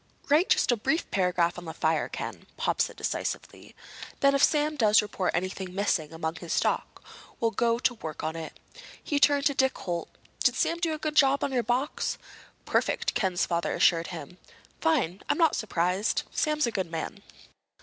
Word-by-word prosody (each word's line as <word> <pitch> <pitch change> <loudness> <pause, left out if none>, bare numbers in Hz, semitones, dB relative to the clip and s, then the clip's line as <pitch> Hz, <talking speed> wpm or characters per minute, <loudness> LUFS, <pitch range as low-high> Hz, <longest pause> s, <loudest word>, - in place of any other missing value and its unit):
"Write 310 +6 +4
just - - +4
a - - +3
brief 315 +9 0
paragraph 180 -2 +1
on 175 - -11
the 160 - -7
fire, 160 -1 +1
Ken," - - -6
Pop - - 0
said - - -1
decisively. - - -4 0.5
"Then, 275 0 +5
if 275 - +2
Sam 300 0 +3
does 215 -5 +5
report 190 -4 -2
anything 185 +1 -3
missing 175 -6 0
among 160 0 -4
his 170 0 -5
stock, - - -1 0.4
we'll 230 -1 +1
go 230 0 +1
to 245 +1 +1
work 160 -10 -7
on 160 +1 -2
it." 160 -1 -7 0.4
He 290 - 0
turned 285 0 +4
to 285 - +3
Dick 265 -1 +1
Holt. 175 -2 -4 0.3
"Did - - +4
Sam 335 - 0
do 330 -2 0
a - - -6
good 305 0 -3
job 275 -1 +4
on 280 - -1
your 250 -2 +1
box?" 250 +5 -1 0.5
"Perfect," - - 0
Ken's 185 -3 +1
father 170 -1 -1
assured 165 -1 +3
him. 175 0 -8 0.4
"Fine. 255 - +1
I'm - - +2
not 330 -3 +4
surprised. 185 0 0
Sam's 305 -2 +1
a 235 - -1
good 190 -5 -2
man." 165 +5 -5
210 Hz, 185 wpm, -28 LUFS, 175-280 Hz, 0.5 s, Then